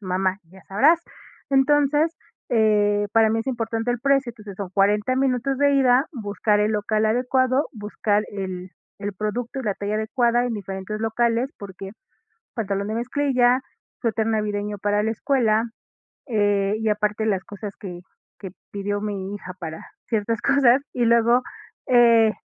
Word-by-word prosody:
Mamá, 190 Hz, 0 st, -1 dB
ya 190 Hz, +1 st, -16 dB
sabrás, 295 Hz, -, +4 dB, 0.5 s
entonces, 290 Hz, +3 st, +3 dB, 0.4 s
eh, 205 Hz, -2 st, +3 dB
para 225 Hz, -1 st, +4 dB
mí 225 Hz, -, +1 dB
es 225 Hz, -, -4 dB
importante 230 Hz, -2 st, -2 dB
el 240 Hz, -, -4 dB
precio, 275 Hz, -2 st, +2 dB
entonces 210 Hz, -4 st, -11 dB
son 195 Hz, -3 st, -5 dB
40 210 Hz, +5 st, +2 dB
minutos 265 Hz, 0 st, 0 dB
de 285 Hz, 0 st, +4 dB
ida, 260 Hz, +1 st, +4 dB
buscar 210 Hz, -2 st, 0 dB
el 210 Hz, +1 st, +2 dB
local 215 Hz, +1 st, 0 dB
adecuado, 255 Hz, +4 st, +1 dB
buscar 210 Hz, -1 st, -1 dB
el 185 Hz, -2 st, -5 dB, 0.3 s
el 205 Hz, 0 st, -4 dB
producto 230 Hz, +6 st, -3 dB
y -, -, -6 dB
la 205 Hz, -4 st, -1 dB
talla 205 Hz, +1 st, -3 dB
adecuada 235 Hz, +2 st, +1 dB
en 245 Hz, -2 st, -2 dB
diferentes 195 Hz, +1 st, -5 dB
locales, 235 Hz, +4 st, 0 dB
porque, 195 Hz, 0 st, -9 dB, 0.6 s
pantalón 200 Hz, -3 st, -2 dB
de 215 Hz, -, -2 dB
mezclilla, 255 Hz, +1 st, +2 dB, 0.4 s
suéter 225 Hz, -2 st, 0 dB
navideño 210 Hz, -1 st, -2 dB
para 205 Hz, +1 st, +1 dB
la 220 Hz, -, 0 dB
escuela, 225 Hz, -2 st, +1 dB, 0.6 s
eh, 205 Hz, -3 st, +1 dB
y 220 Hz, -, -2 dB
aparte 210 Hz, +1 st, 0 dB
las 195 Hz, -4 st, 0 dB
cosas 205 Hz, 0 st, -8 dB
que 180 Hz, -4 st, -8 dB, 0.4 s
que 190 Hz, -3 st, -7 dB, 0.2 s
pidió 205 Hz, 0 st, -3 dB
mi 200 Hz, -2 st, -4 dB
hija 190 Hz, -2 st, -7 dB
para 160 Hz, -2 st, -6 dB, 0.3 s
ciertas 225 Hz, 0 st, -1 dB
cosas, 275 Hz, -1 st, +4 dB
y 245 Hz, -, 0 dB
luego, 235 Hz, +2 st, +4 dB, 0.5 s
eh, 235 Hz, -3 st, +6 dB
220 Hz, 150 wpm, -23 LUFS, 205-245 Hz, 0.6 s, eh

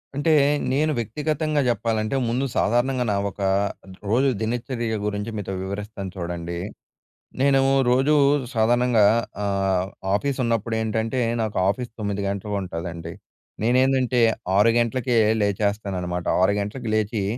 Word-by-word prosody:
అంటే 145 Hz, +3 st, +1 dB, 0.4 s
నేను 155 Hz, +3 st, +2 dB
వ్యక్తిగతంగా 150 Hz, +5 st, -1 dB
చెప్పాలంటే, 110 Hz, +1 st, -1 dB
ముందు 125 Hz, +4 st, 0 dB
సాధారణంగా 125 Hz, +3 st, +1 dB
నా -, -, +1 dB
ఒక 100 Hz, -, -11 dB, 0.7 s
రోజు 130 Hz, +5 st, +3 dB
దినచర్య 115 Hz, 0 st, -2 dB
గురించి, 105 Hz, +2 st, -3 dB
మీతో 95 Hz, -1 st, -4 dB
వివరిస్తాను 100 Hz, 0 st, -5 dB
చూడండి. 85 Hz, -1 st, -4 dB, 0.8 s
నేను 135 Hz, -1 st, +4 dB, 0.3 s
రోజూ 135 Hz, +4 st, +3 dB, 0.4 s
సాధారణంగా 120 Hz, 0 st, +3 dB, 0.4 s
ఆహ్, 95 Hz, -2 st, 0 dB, 0.2 s
ఆఫీస్ 140 Hz, +6 st, 0 dB
ఉన్నప్పుడు 115 Hz, -1 st, -1 dB
ఏంటంటే, 110 Hz, +3 st, -1 dB, 0.2 s
నాకు 110 Hz, -2 st, -2 dB
ఆఫీస్ 120 Hz, +2 st, -3 dB
9 100 Hz, -1 st, -2 dB
గంటలకి 100 Hz, +1 st, -3 dB
ఉంటదండి. 85 Hz, -2 st, -6 dB, 0.5 s
నేనేందంటే 130 Hz, 0 st, +2 dB, 0.4 s
6 105 Hz, +3 st, +5 dB
గంట్లకే 120 Hz, +1 st, 0 dB, 0.2 s
లేచేస్తాననమాట. 100 Hz, -3 st, -1 dB, 0.2 s
6 100 Hz, +2 st, +4 dB
గంట్లకి 110 Hz, +4 st, -4 dB
లేచి, 110 Hz, -1 st, 0 dB
110 Hz, 115 wpm, -23 LUFS, 100-125 Hz, 0.8 s, 6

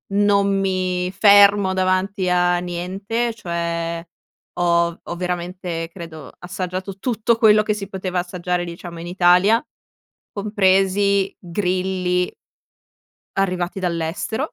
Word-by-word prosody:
non 200 Hz, -1 st, +3 dB
mi 185 Hz, -1 st, -1 dB
fermo 200 Hz, -1 st, +6 dB
davanti 185 Hz, 0 st, 0 dB
a 180 Hz, 0 st, +3 dB
niente, 190 Hz, +7 st, -3 dB
cioè 170 Hz, -4 st, -3 dB, 0.5 s
ho 170 Hz, -1 st, +2 dB
ho 175 Hz, -, -6 dB
veramente 180 Hz, -1 st, -4 dB
credo 160 Hz, -5 st, -9 dB
assaggiato 185 Hz, +2 st, -5 dB
tutto 230 Hz, -1 st, 0 dB
quello 215 Hz, -2 st, +5 dB
che 215 Hz, -, 0 dB
si 200 Hz, -2 st, -6 dB
poteva 185 Hz, -2 st, -3 dB
assaggiare, 180 Hz, 0 st, -2 dB
diciamo, 170 Hz, 0 st, -8 dB
in 170 Hz, -, -7 dB
Italia, 180 Hz, +8 st, +4 dB, 0.7 s
compresi 200 Hz, -1 st, +2 dB
grilli. 180 Hz, 0 st, -1 dB, 1.0 s
arrivati 185 Hz, 0 st, -1 dB
dall'estero. 175 Hz, -, -2 dB
185 Hz, 105 wpm, -21 LUFS, 175-200 Hz, 1.0 s, fermo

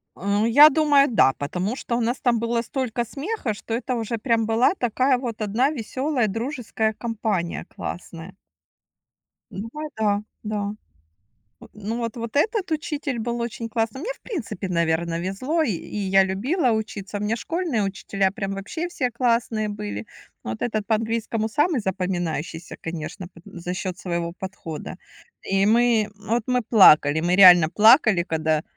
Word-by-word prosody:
А 200 Hz, +4 st, 0 dB
я 290 Hz, +6 st, +9 dB
думаю 290 Hz, -2 st, +4 dB
да, 135 Hz, -, +4 dB
потому 180 Hz, -, -3 dB
что 240 Hz, -2 st, -3 dB
у -, -, -1 dB
нас 240 Hz, +3 st, -1 dB
там 240 Hz, -2 st, +2 dB
было 235 Hz, 0 st, 0 dB
столько 240 Hz, -1 st, -3 dB
смеха, 280 Hz, -, -3 dB
что 225 Hz, +2 st, -7 dB
это 250 Hz, +2 st, -2 dB
уже 230 Hz, 0 st, -3 dB
прям 225 Hz, -1 st, +1 dB
была 225 Hz, +8 st, +3 dB
такая 255 Hz, -, +1 dB
вот 240 Hz, -3 st, -5 dB
одна 220 Hz, +6 st, +1 dB
весёлая 260 Hz, -1 st, -1 dB
дружеская 225 Hz, 0 st, -2 dB
компания- 215 Hz, -6 st, -3 dB
классная. 175 Hz, +1 st, -7 dB, 1.2 s
Ну 210 Hz, +4 st, -6 dB
вай 305 Hz, +1 st, -5 dB
да, 205 Hz, -2 st, +1 dB, 0.2 s
да. 210 Hz, -1 st, -2 dB, 0.9 s
Э, -, -, -12 dB
ну 215 Hz, +3 st, -5 dB
вот 230 Hz, -1 st, -4 dB
вот 230 Hz, -1 st, -6 dB
этот 410 Hz, +4 st, +1 dB
учитель 295 Hz, -4 st, -3 dB
был 235 Hz, +1 st, -3 dB
очень 235 Hz, 0 st, -4 dB
классный. 225 Hz, +2 st, -2 dB
Мне, 425 Hz, +11 st, -4 dB
в -, -, -26 dB
принципе, 235 Hz, -, -5 dB
наверно, 170 Hz, -1 st, 0 dB
везло, 255 Hz, -, -1 dB
и 290 Hz, -, 0 dB
и 175 Hz, -, -7 dB
я 195 Hz, -1 st, +3 dB
любила 245 Hz, -, 0 dB
учиться. 215 Hz, -2 st, -4 dB
У -, -, -7 dB
меня 210 Hz, +2 st, 0 dB
школьные 320 Hz, -, -2 dB
учителя 195 Hz, 0 st, -1 dB
прям 195 Hz, -2 st, -4 dB
вообще 320 Hz, -, -4 dB
все 260 Hz, -8 st, -2 dB
классные 230 Hz, -3 st, 0 dB
были. 105 Hz, -, -5 dB, 0.4 s
Ну -, -, -5 dB
вот 110 Hz, -, -5 dB
этот 215 Hz, -3 st, -2 dB
по 220 Hz, -, +3 dB
английскому 225 Hz, 0 st, -2 dB
самый 295 Hz, +4 st, +1 dB
запоминающийся, 175 Hz, -4 st, -3 dB
конечно, 170 Hz, +2 st, -6 dB
пот 170 Hz, -, -18 dB
за 175 Hz, +1 st, -6 dB
счёт 185 Hz, -1 st, -4 dB
своего 170 Hz, -2 st, -3 dB
подхода. 185 Hz, -5 st, -7 dB, 0.5 s
И 195 Hz, 0 st, +1 dB
мы, 230 Hz, -1 st, +3 dB
вот 220 Hz, +3 st, -1 dB
мы 250 Hz, -1 st, +1 dB
плакали, 160 Hz, -9 st, +6 dB
мы 175 Hz, +2 st, +1 dB
реально 180 Hz, -4 st, +9 dB
плакали, 215 Hz, -, +5 dB
когда, 155 Hz, -2 st, 0 dB
220 Hz, 165 wpm, -23 LUFS, 190-245 Hz, 1.2 s, я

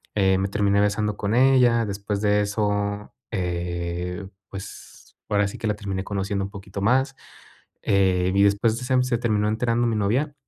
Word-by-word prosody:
eh, 95 Hz, -2 st, +3 dB
me 95 Hz, -, 0 dB
terminé 100 Hz, 0 st, +2 dB
besando 105 Hz, 0 st, 0 dB
con 105 Hz, +3 st, -1 dB
ella. 125 Hz, -3 st, +4 dB
Después 100 Hz, 0 st, -3 dB
de 105 Hz, 0 st, +3 dB
eso, 105 Hz, 0 st, -1 dB, 0.2 s
eh, 90 Hz, +1 st, -3 dB, 0.2 s
pues 100 Hz, 0 st, -11 dB
ahora 100 Hz, -1 st, +2 dB
sí -, -, -7 dB
que 110 Hz, -, -2 dB
la 105 Hz, -, 0 dB
terminé 95 Hz, -2 st, -4 dB
conociendo 100 Hz, 0 st, -2 dB
un -, -, -7 dB
poquito 100 Hz, -1 st, -7 dB
más. 130 Hz, +5 st, +2 dB, 0.7 s
Eh, 95 Hz, -2 st, +2 dB
y 100 Hz, -, +4 dB
después 105 Hz, +3 st, +2 dB
de 130 Hz, -, -7 dB
sem 130 Hz, -1 st, +2 dB
se 125 Hz, -2 st, 0 dB
terminó 105 Hz, -3 st, +1 dB
enterando 115 Hz, +2 st, +1 dB
mi 115 Hz, -, 0 dB
novia, 130 Hz, +9 st, 0 dB
105 Hz, 170 wpm, -24 LUFS, 100-115 Hz, 0.7 s, ella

